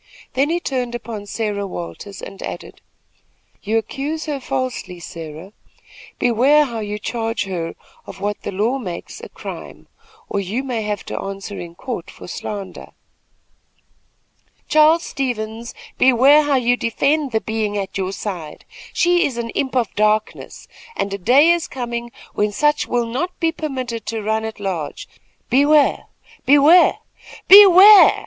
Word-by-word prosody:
Then 275 Hz, +3 st, +1 dB
he 340 Hz, +1 st, 0 dB
turned 250 Hz, -6 st, -3 dB
upon 225 Hz, -3 st, -7 dB
Sarah 205 Hz, -2 st, -3 dB
Williams, 190 Hz, +2 st, -8 dB
and 195 Hz, -, -9 dB
added: -, -, -8 dB, 0.8 s
"You 220 Hz, +2 st, 0 dB
accuse 290 Hz, +7 st, -3 dB
her 295 Hz, -3 st, -3 dB
falsely, 255 Hz, -9 st, -4 dB
Sarah. 165 Hz, +3 st, -9 dB, 0.6 s
Beware 265 Hz, +6 st, +4 dB
how 235 Hz, -4 st, -5 dB
you 210 Hz, -1 st, -4 dB
charge 225 Hz, +1 st, -3 dB
her 175 Hz, -4 st, -5 dB, 0.3 s
of -, -, -10 dB
what 205 Hz, +1 st, -3 dB
the -, -, -5 dB
law 220 Hz, +8 st, 0 dB
makes 180 Hz, -8 st, -7 dB
a -, -, -9 dB
crime, -, -, -9 dB, 0.4 s
or 200 Hz, -, -2 dB
you 205 Hz, +7 st, -3 dB
may 245 Hz, -4 st, -3 dB
have 210 Hz, -1 st, -4 dB
to -, -, -5 dB
answer 195 Hz, +1 st, -6 dB
in 170 Hz, -1 st, -8 dB
a -, -, -29 dB
court 230 Hz, -5 st, -6 dB
for -, -, -12 dB
slander." 195 Hz, +1 st, -7 dB, 1.7 s
"Charles 310 Hz, +2 st, +4 dB
Stevens, 230 Hz, -3 st, -4 dB, 0.2 s
beware 265 Hz, +4 st, +6 dB
how 290 Hz, -2 st, +1 dB
you 245 Hz, -1 st, +2 dB
defend 275 Hz, +5 st, 0 dB
the 220 Hz, -, +1 dB
being 220 Hz, -2 st, -2 dB
at 195 Hz, -1 st, -4 dB
your 190 Hz, -1 st, -2 dB
side. 180 Hz, -7 st, -7 dB, 0.3 s
She 350 Hz, 0 st, +3 dB
is 255 Hz, -4 st, -7 dB
an 230 Hz, -1 st, -4 dB
imp 265 Hz, -2 st, -2 dB
of 240 Hz, -4 st, 0 dB
darkness, 215 Hz, +1 st, -1 dB, 0.3 s
and 200 Hz, -, -2 dB
a 200 Hz, -, -4 dB
day 270 Hz, -, +5 dB
is 345 Hz, -1 st, 0 dB
coming 240 Hz, -2 st, -5 dB, 0.2 s
when 210 Hz, 0 st, 0 dB
such 295 Hz, +7 st, +1 dB
will 240 Hz, -1 st, 0 dB
not 265 Hz, +11 st, -4 dB
be 330 Hz, -1 st, +1 dB
permitted 260 Hz, -8 st, -5 dB
to 225 Hz, -1 st, -3 dB
run 220 Hz, +1 st, -1 dB
at 220 Hz, -1 st, -7 dB
large. 185 Hz, -7 st, -4 dB, 0.4 s
Beware! 290 Hz, +3 st, +3 dB, 0.4 s
beware! 290 Hz, +6 st, +6 dB, 0.5 s
BEWARE!" 400 Hz, +1 st, +9 dB
235 Hz, 150 wpm, -20 LUFS, 205-275 Hz, 1.7 s, BEWARE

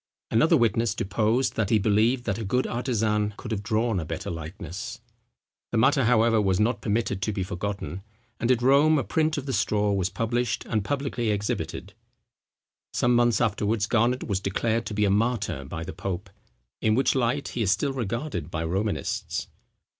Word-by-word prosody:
Another 155 Hz, +9 st, +4 dB
witness 115 Hz, -2 st, +1 dB
deposed, 110 Hz, +6 st, +1 dB
that 110 Hz, -3 st, 0 dB
he 110 Hz, -, +4 dB
believed 110 Hz, +4 st, +2 dB
that 105 Hz, -3 st, -2 dB
a -, -, -3 dB
good 125 Hz, +6 st, 0 dB
artisan 110 Hz, -4 st, 0 dB
could 120 Hz, -, -7 dB
have 105 Hz, -2 st, -1 dB
drawn 110 Hz, 0 st, 0 dB
a -, -, -3 dB
better 80 Hz, +1 st, -5 dB
likeness. 85 Hz, +7 st, -6 dB, 0.7 s
The 120 Hz, -, 0 dB
matter, 135 Hz, +3 st, +4 dB
however, 115 Hz, -1 st, +4 dB
was 95 Hz, -2 st, +1 dB
not 110 Hz, 0 st, +1 dB
permitted 105 Hz, -2 st, -1 dB
to 110 Hz, -, 0 dB
be 100 Hz, -2 st, -2 dB
forgotten; 95 Hz, 0 st, -4 dB, 0.4 s
and 120 Hz, -, 0 dB
at 125 Hz, -2 st, +3 dB
Rome 145 Hz, +4 st, +5 dB
a 135 Hz, -, +1 dB
print 155 Hz, 0 st, 0 dB
of 140 Hz, -, -4 dB
the 135 Hz, -, -3 dB
straw 105 Hz, -1 st, +1 dB
was 95 Hz, -2 st, 0 dB
published 115 Hz, +3 st, -1 dB
and 110 Hz, -3 st, -1 dB
publicly 135 Hz, -1 st, -2 dB
exhibited. 105 Hz, 0 st, -3 dB, 1.0 s
Some 120 Hz, 0 st, +2 dB
months 120 Hz, -3 st, +3 dB
afterwards 105 Hz, -1 st, +1 dB
Garnet 120 Hz, +3 st, +1 dB
was 100 Hz, -4 st, -1 dB
declared 110 Hz, +4 st, -1 dB
to 105 Hz, -, -4 dB
be 105 Hz, 0 st, +2 dB
a 100 Hz, -, +2 dB
martyr 105 Hz, -, 0 dB
by 80 Hz, +4 st, -5 dB
the 95 Hz, -, -6 dB
pope; 95 Hz, +1 st, -5 dB, 0.5 s
in 110 Hz, -1 st, +3 dB
which 135 Hz, -, +3 dB
light 130 Hz, +2 st, 0 dB
he 120 Hz, -, -3 dB
is 105 Hz, -, +1 dB
still 120 Hz, +9 st, +1 dB
regarded 120 Hz, -, -3 dB
by 80 Hz, 0 st, -3 dB
Romanists. 95 Hz, +5 st, -2 dB
110 Hz, 180 wpm, -26 LUFS, 100-120 Hz, 1.0 s, Rome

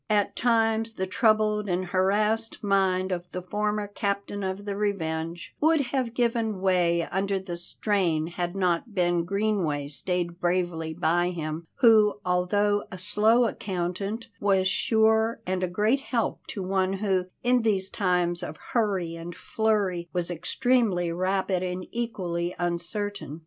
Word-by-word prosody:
At 205 Hz, -1 st, +1 dB
times 225 Hz, -1 st, +2 dB
the 190 Hz, -, -1 dB
troubled 215 Hz, 0 st, +2 dB
and 180 Hz, +1 st, 0 dB
harassed 210 Hz, +5 st, +1 dB
mind 190 Hz, -2 st, +2 dB
of 175 Hz, 0 st, -3 dB
the 180 Hz, -, -4 dB
former 210 Hz, +2 st, -1 dB
captain 200 Hz, 0 st, -3 dB
of 190 Hz, +1 st, -3 dB
the 200 Hz, -1 st, -3 dB
Revenge 170 Hz, -5 st, -3 dB
would 320 Hz, +1 st, +4 dB
have 250 Hz, -4 st, -1 dB
given 230 Hz, -4 st, 0 dB
way 175 Hz, -3 st, +2 dB
under 195 Hz, +1 st, 0 dB
the 185 Hz, -2 st, -5 dB
strain 175 Hz, -2 st, 0 dB
had 175 Hz, +1 st, -4 dB
not 185 Hz, +3 st, 0 dB
Ben 175 Hz, -2 st, +2 dB
Greenway 185 Hz, -8 st, 0 dB
stayed 175 Hz, +3 st, -2 dB
bravely 175 Hz, -3 st, 0 dB
by 175 Hz, +1 st, +2 dB
him; 160 Hz, -1 st, -5 dB
who, 220 Hz, -4 st, +6 dB
although 205 Hz, +3 st, +1 dB
a 185 Hz, -, -6 dB
slow 215 Hz, +5 st, +3 dB
accountant, 195 Hz, +2 st, -3 dB
was 195 Hz, -2 st, +2 dB
sure, 220 Hz, +3 st, +2 dB
and 185 Hz, 0 st, -1 dB
a 185 Hz, -, +1 dB
great 210 Hz, +9 st, +1 dB
help 240 Hz, -5 st, -2 dB
to 195 Hz, -, -5 dB
one 190 Hz, 0 st, 0 dB
who, 190 Hz, -2 st, 0 dB, 0.2 s
in 245 Hz, 0 st, +3 dB
these 195 Hz, -4 st, 0 dB
times 180 Hz, -2 st, +1 dB
of 155 Hz, -3 st, -6 dB, 0.2 s
hurry 195 Hz, -8 st, +1 dB
and 165 Hz, +1 st, -7 dB
flurry, 200 Hz, -6 st, 0 dB
was 175 Hz, -1 st, -2 dB
extremely 185 Hz, -1 st, +1 dB
rapid 185 Hz, +1 st, 0 dB
and 185 Hz, 0 st, -3 dB
equally 180 Hz, -7 st, -3 dB
uncertain. 175 Hz, -1 st, -3 dB
190 Hz, 145 wpm, -26 LUFS, 175-210 Hz, 0.2 s, who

